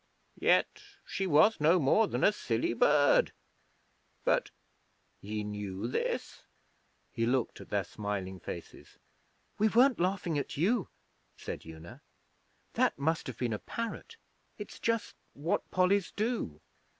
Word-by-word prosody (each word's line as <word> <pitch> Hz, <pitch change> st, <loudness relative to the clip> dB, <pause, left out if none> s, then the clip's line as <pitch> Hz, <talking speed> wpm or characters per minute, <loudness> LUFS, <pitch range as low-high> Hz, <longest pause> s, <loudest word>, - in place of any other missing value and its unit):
Yet -, -, +2 dB, 0.2 s
she 195 Hz, -, -2 dB
was 160 Hz, +7 st, +5 dB
no 165 Hz, +4 st, +5 dB
more 170 Hz, +10 st, +4 dB
than -, -, -2 dB
a -, -, +6 dB
silly 115 Hz, -, -1 dB
bird. 145 Hz, +4 st, +4 dB, 0.9 s
But -, -, +2 dB, 0.7 s
ye 105 Hz, +1 st, -4 dB
knew 105 Hz, -1 st, -5 dB
this?' 125 Hz, -, -3 dB, 0.7 s
He 115 Hz, 0 st, -1 dB
looked 125 Hz, -1 st, 0 dB
at -, -, -12 dB
their -, -, 0 dB
smiling 100 Hz, -3 st, -5 dB
faces. 85 Hz, -, -9 dB, 0.6 s
'We 215 Hz, -, +4 dB
weren't 245 Hz, +4 st, +4 dB
laughing 180 Hz, -4 st, 0 dB
at 140 Hz, -, -5 dB
you,' 195 Hz, +6 st, +1 dB, 0.5 s
said -, -, -7 dB
Una. 80 Hz, +1 st, -11 dB, 0.7 s
'That -, -, +2 dB
must 160 Hz, +4 st, 0 dB
have 130 Hz, -, -6 dB
been 120 Hz, -3 st, -1 dB
a 105 Hz, -, -3 dB
parrot. 230 Hz, -, -6 dB, 0.4 s
It's 210 Hz, -, -9 dB
just 230 Hz, -1 st, -1 dB, 0.2 s
what 155 Hz, +5 st, -1 dB
Pollies 185 Hz, +1 st, +2 dB
do.' 210 Hz, -, -2 dB
150 Hz, 130 wpm, -31 LUFS, -, 0.9 s, a